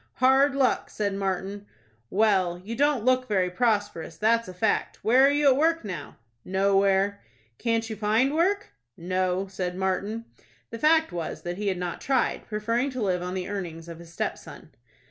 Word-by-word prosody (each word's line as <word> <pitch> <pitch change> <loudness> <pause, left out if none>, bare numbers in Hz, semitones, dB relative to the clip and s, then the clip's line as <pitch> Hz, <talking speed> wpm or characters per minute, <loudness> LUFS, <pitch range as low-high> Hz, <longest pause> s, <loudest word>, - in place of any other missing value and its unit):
"Hard 270 +2 +4
luck!" 270 -2 +1
said 205 -2 -2
Martin. 195 +1 -3 0.4
"Well, 190 -4 +2
you 230 +2 -4
don't 280 -3 +1
look 255 0 +2
very 185 -4 +1
prosperous, 205 -6 -1
that's 230 +2 +2
a 185 - -8
fact. 205 +4 0
Where 250 +4 +5
are - - +4
you 290 +1 +1
at 260 - +4
work 325 -1 +1
now?" 175 -8 -7 0.3
"Nowhere." 195 +1 +2 0.4
"Can't 230 -1 0
you 220 - -5
find 220 +6 +1
work?" 385 +6 +1 0.3
"No," 185 +2 -1
said 185 -2 -4
Martin. 195 +4 -2 0.5
The 230 - -6
fact 320 +3 +3
was 170 -2 -5
that 175 +1 -4
he 205 0 -3
had 190 -2 0
not 175 -1 -4
tried, 265 -2 0
preferring 230 +5 -1
to 255 -1 -6
live 180 -3 0
on 180 +1 -4
the 185 -1 -3
earnings 170 -5 -5
of 170 -1 -9
his 170 -1 -13
stepson. - - -6
205 Hz, 175 wpm, -26 LUFS, 185-245 Hz, 0.5 s, Where